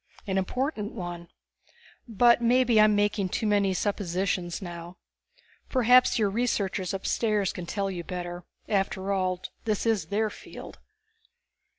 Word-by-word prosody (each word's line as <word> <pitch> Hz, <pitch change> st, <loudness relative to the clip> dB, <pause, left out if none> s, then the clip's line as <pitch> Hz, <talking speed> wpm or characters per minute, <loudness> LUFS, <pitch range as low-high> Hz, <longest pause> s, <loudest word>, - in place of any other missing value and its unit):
"An 190 Hz, -2 st, 0 dB
important 220 Hz, +1 st, -2 dB
one. 175 Hz, -1 st, -6 dB, 0.8 s
But 235 Hz, +2 st, +4 dB
maybe 240 Hz, -2 st, +4 dB
I'm 215 Hz, 0 st, +5 dB
making 205 Hz, -2 st, +1 dB
too 220 Hz, -, -2 dB
many 205 Hz, -2 st, +2 dB
suppositions 185 Hz, -3 st, -1 dB
now. 175 Hz, -1 st, -8 dB, 0.7 s
Perhaps 250 Hz, 0 st, +5 dB
your 210 Hz, -3 st, +1 dB
researchers 200 Hz, -5 st, -1 dB
upstairs 205 Hz, +1 st, 0 dB
can 175 Hz, -1 st, -7 dB
tell 195 Hz, +1 st, -2 dB
you 175 Hz, -2 st, -5 dB
better; 175 Hz, +1 st, -6 dB, 0.2 s
after 195 Hz, -1 st, -1 dB
all, 185 Hz, -1 st, -1 dB, 0.2 s
this 215 Hz, -1 st, -1 dB
is 220 Hz, -7 st, +1 dB
their 215 Hz, +3 st, 0 dB
field." -, -, -11 dB
200 Hz, 125 wpm, -27 LUFS, 185-220 Hz, 0.8 s, I'm